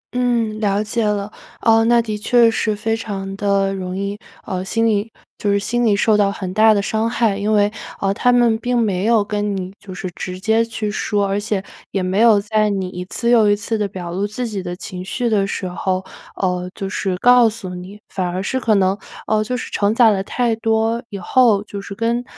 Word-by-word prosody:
嗯， 235 -3 0
了 205 -1 +1
解 225 +2 -1
了。 210 -1 -1 0.3
呃， 225 0 +4
那 235 +1 +4
的 220 -2 -2
确 235 +2 +4
是 215 -1 0
非 225 +2 -1
常 195 -3 -5
地 195 -1 +1
容 185 -1 -4
易， 200 +1 -3 0.3
呃， 185 -1 -3
心 225 +4 0
理 215 0 +1 0.3
就 205 - 0
是 200 - +3
心 240 +4 -1
理 215 -3 +3
受 215 +2 +3
到 205 -1 +3
很 185 -2 -5
大 220 +2 +6
的 210 - +3
伤 220 +2 0
害。 230 -4 +1
因 205 +2 -1
为， 205 -1 +3 0.3
呃， 195 0 +1
他 245 +4 +2
们 240 -2 +4
并 245 +1 0
没 200 -5 0
有 225 -2 +4
跟 205 -1 -2
你 185 0 -5
就 200 - -11
是 185 - -5
直 180 0 -6
接 220 +3 +2
去 225 -2 -4
说， 205 -1 0
而 195 +1 0
且 205 -2 -2 0.3
也 195 - -2
没 185 +2 0
有 225 -2 +6
在 215 +1 +1
你 195 -2 -2
一 180 -1 -6
次 235 +5 -1
又 225 -3 +5
一 205 - +4
次 210 +2 -3
地 210 -2 0
表 180 -3 -7
露 195 +4 -1
自 240 +4 -4
己 205 -3 -4
的 175 -1 -5
情 180 0 -7
绪 240 +6 -2
的 200 -3 +2
时 190 - -3
候， 185 +1 -2 0.3
呃， 180 -1 -1
就 195 - -4
是 190 -1 -2
告 245 +2 +6
诉 210 -4 -7
你。 185 +3 -9
反 185 -2 -3
而 180 +2 -3
是 260 +7 -1
可 225 -4 +2
能， 190 -1 +2 0.3
呃， 215 0 +1
就 250 +4 -3
是 - - -6
承 205 +1 +1
载 230 -2 +6
了 195 -2 0
太 235 +2 0
多 225 +1 0
以 200 - -6
后， 210 +1 +3
就 205 -1 -7
是 200 0 -8
跟 230 +3 0
210 Hz, 245 characters per minute, -19 LUFS, 195-225 Hz, 0.3 s, 大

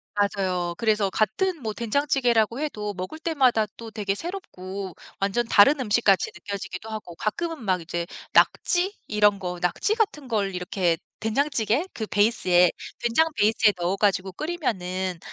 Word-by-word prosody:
맞아요. 185 -4 0
그래서 215 -3 +2
같은 330 - 0
뭐 220 -3 -3
된장찌개라고 240 -1 +1
해도 210 -9 -3
먹을 185 +12 -6
때마다 265 -9 +2
또 230 -1 -8
되게 210 -3 -2
새롭고 200 - -6 0.3
완전 200 +4 0
다른 275 +8 +6
음식같이 210 -5 +3
느껴지기도 195 +2 -6
하고 215 -6 -7
가끔은 320 - -3
막 185 -4 +1
이제 170 +1 -3 0.3
낙지 375 +3 +3
이런 210 -1 +3
거, 180 -1 -4
낙지 180 - 0
같은 405 - -1
걸 205 -5 0
이렇게 180 -1 0 0.2
된장찌개 240 - 0
그 220 - -4
베이스에, 185 -5 +3 0.3
된장 240 +7 +3
베이스에 215 0 +4
넣어 175 +2 0
가지고 195 -2 +1
끓이면은 190 - -3
210 Hz, 335 characters per minute, -25 LUFS, 190-255 Hz, 0.3 s, 다른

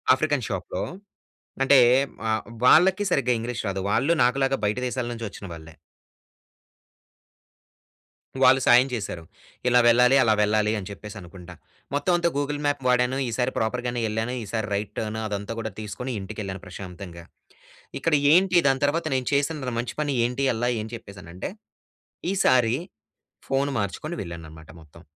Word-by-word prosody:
African 145 -3 -1
షాప్‌లో 95 -3 -3 0.8
అంటే, 135 0 +6 0.4
వ - - -2 0.4
వాళ్ళకి 190 +8 +6
సరిగ్గా 125 -2 +2
ఇంగ్లీష్ 120 +1 -4
రాదు. 95 0 -2
వాళ్ళు 135 +10 +2
నాకు‌లాగా 135 +2 +1
బయట 105 +2 0
దేశాల 125 -1 -3
నుంచి 115 -1 -5
వచ్చిన 100 - -10
వాళ్ళే. 80 -1 -11 2.7
వాళ్ళు 130 +1 +6
సాయం 125 +2 +6
చేశారు. 95 -7 -5 0.4
ఇలా 125 0 +5
వెళ్ళాలి. 125 +3 +5
అలా 110 - +4
వెళ్ళాలి 105 +1 +2
అని 95 - -6
చెప్పేసి 105 +1 -9
అనుకుంట. 90 0 -12 0.4
మొత్తం 145 +6 +1
అంతా 170 0 +2
గూగుల్ 145 +1 -2
మ్యాప్ 145 -2 0
వాడాను. 125 +1 +2
ఈసారి 125 +3 -1
ప్రాపర్‌ 115 +3 -1
గానే 120 0 -2
ఎల్లాను. 110 +3 -2
ఈసారి 110 0 -3
రైట్ 100 0 -3
టర్న్ 110 0 -3
అదంతా 100 +1 -4
కూడా 110 - -4
తీసుకొని, 125 +5 -5
ఇంటికెళ్ళాను 95 -2 -6
ప్రశాంతంగా. 90 -2 -9 0.8
ఇక్కడ 165 - +1 0.2
ఏంటి, 185 +2 +4
దాని 135 0 +1
తర్వాత 160 +3 -1
నేను 130 -2 -1
చేసిన 140 -3 -1
మంచి 120 - -4
పని 145 -2 0
ఏంటి 125 +3 -1
అల్లా 120 +2 0
అని 110 +2 -9
చెప్పేసానంటే, 95 -5 -8 0.8
ఈసారి 125 -11 +3 0.7
ఫోన్ 135 +1 +1
మార్చుకొని 105 - -4
వెళ్ళాను 85 -3 -7
అన్నమాట 80 0 -13
మొత్తం. 80 +1 -17
120 Hz, 145 wpm, -25 LUFS, 100-135 Hz, 2.7 s, అంటే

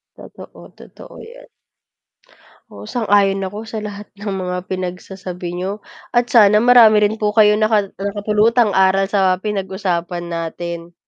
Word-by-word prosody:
Totoo, - - -14
totoo - - -14
yan. - - -13 1.3
Oo, - - -11
sang-ayon 200 -4 +1
ako 210 +4 -7
sa 220 -1 -6
lahat 205 0 -8
ng 205 0 -6
mga 180 0 -3
pinagsasabi 180 -1 -6
niyo 190 +4 -5 0.3
at 240 0 +1
sana 210 -1 +5
marami 225 -4 +6
rin 215 +1 0
po 210 0 -1
kayong 210 -1 +4
naka 215 -2 +1
nakapulutang 210 +3 +1
aral 190 0 +3
sa 190 -2 +2
pinag-usapan 185 -4 -3
natin. 170 +1 -6
200 Hz, 130 wpm, -18 LUFS, 185-215 Hz, 1.3 s, marami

